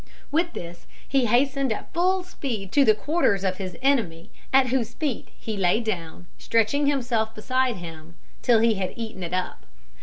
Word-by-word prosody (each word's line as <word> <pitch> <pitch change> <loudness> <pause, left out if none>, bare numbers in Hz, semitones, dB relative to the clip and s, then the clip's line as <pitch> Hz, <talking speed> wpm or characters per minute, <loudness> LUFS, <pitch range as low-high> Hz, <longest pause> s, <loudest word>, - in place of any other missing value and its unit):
With 335 +3 +1
this 170 0 -8 0.2
he 270 -2 +2
hastened 270 +2 +2
at 220 - -5
full 370 +2 +2
speed 235 - -5
to 285 - +5
the 215 -5 +5
quarters 220 - +1
of 185 -1 0
his 185 -3 -6
enemy, 215 -13 +1 0.2
at 265 -1 +5
whose 240 -3 -1
feet 290 -7 -2
he 220 - -4
laid 200 +4 +1
it - - +4
down, 170 -1 -7
stretching 230 +6 +2
himself 240 -5 0
beside 255 +2 0
him 165 -1 -10 0.3
till 235 -3 +4
he 230 0 +4
had 190 -3 -3
eaten 225 -4 -6
it 170 -1 -4
up. 180 - -3
225 Hz, 180 wpm, -25 LUFS, 185-270 Hz, 0.3 s, to